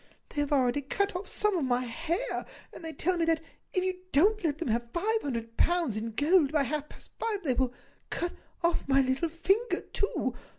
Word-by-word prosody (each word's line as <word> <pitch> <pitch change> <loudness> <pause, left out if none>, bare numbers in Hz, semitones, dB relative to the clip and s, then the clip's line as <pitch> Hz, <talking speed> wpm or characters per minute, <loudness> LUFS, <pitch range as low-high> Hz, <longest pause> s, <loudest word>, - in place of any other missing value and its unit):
They 290 - -1
have 290 - -2
already 270 0 +3
cut 395 +9 -1
off 365 +3 -4
some 420 -2 +1
of 335 - +1
my 250 -1 +1
hair, 330 - -2 0.3
and - - -10
they 325 - -4
tell 360 +3 0
me 335 - +2
that, 325 -1 +3 0.3
if 370 - +1
you 370 -1 -1
don't 405 +8 +4
let 300 -3 +1
them 320 -5 -3
have 235 +1 0
five 440 +6 +1
hundred 230 -4 -4
pounds 340 -10 +2
in 225 +1 -3
gold 295 - +4
by 300 -2 +3
half 300 +2 -2
past - - -15
five, 420 -4 -1
they 270 -5 +2
will 255 0 +1 0.4
cut 345 0 -2 0.3
off 340 -4 +1
my 275 0 +5
little 265 +5 +1
finger 390 +8 +1
too. 405 - -1
320 Hz, 210 wpm, -30 LUFS, 265-365 Hz, 0.4 s, my